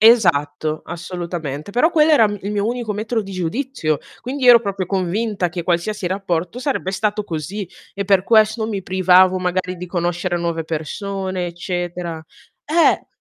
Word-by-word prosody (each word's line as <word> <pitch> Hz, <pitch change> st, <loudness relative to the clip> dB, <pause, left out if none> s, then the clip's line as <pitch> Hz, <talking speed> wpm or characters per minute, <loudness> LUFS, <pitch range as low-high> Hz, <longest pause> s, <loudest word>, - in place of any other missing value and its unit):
Esatto, 155 Hz, -9 st, +3 dB
assolutamente. 170 Hz, -2 st, -5 dB
Però 310 Hz, +8 st, +3 dB
quello 310 Hz, -1 st, +4 dB
era 225 Hz, -7 st, +6 dB
m 205 Hz, 0 st, -4 dB
il 205 Hz, -, -3 dB
mio 205 Hz, -1 st, 0 dB
unico 235 Hz, -2 st, -2 dB
metro 220 Hz, +3 st, -1 dB
di 195 Hz, -2 st, -7 dB
giudizio, 185 Hz, -, -1 dB, 0.2 s
quindi 255 Hz, +1 st, -2 dB
ero 240 Hz, -2 st, +9 dB
proprio 195 Hz, -3 st, -3 dB
convinta 190 Hz, +1 st, -1 dB
che 175 Hz, 0 st, -5 dB
qualsiasi 180 Hz, +3 st, -1 dB
rapporto 180 Hz, +3 st, -2 dB
sarebbe 260 Hz, -9 st, -1 dB
stato 210 Hz, +1 st, -1 dB
così 175 Hz, +4 st, -4 dB, 0.3 s
e 200 Hz, -, -2 dB
per 195 Hz, -1 st, +4 dB
questo 220 Hz, +1 st, +3 dB
mi 200 Hz, -3 st, -2 dB
privavo 185 Hz, 0 st, +4 dB
magari 180 Hz, 0 st, -1 dB
di 180 Hz, +1 st, -7 dB
conoscere 175 Hz, 0 st, -1 dB
nuove 170 Hz, -1 st, -2 dB
persone, 185 Hz, +4 st, -3 dB
eccetera 175 Hz, -1 st, -4 dB, 0.4 s
eh. 325 Hz, +2 st, +3 dB
185 Hz, 155 wpm, -20 LUFS, 175-215 Hz, 0.4 s, ero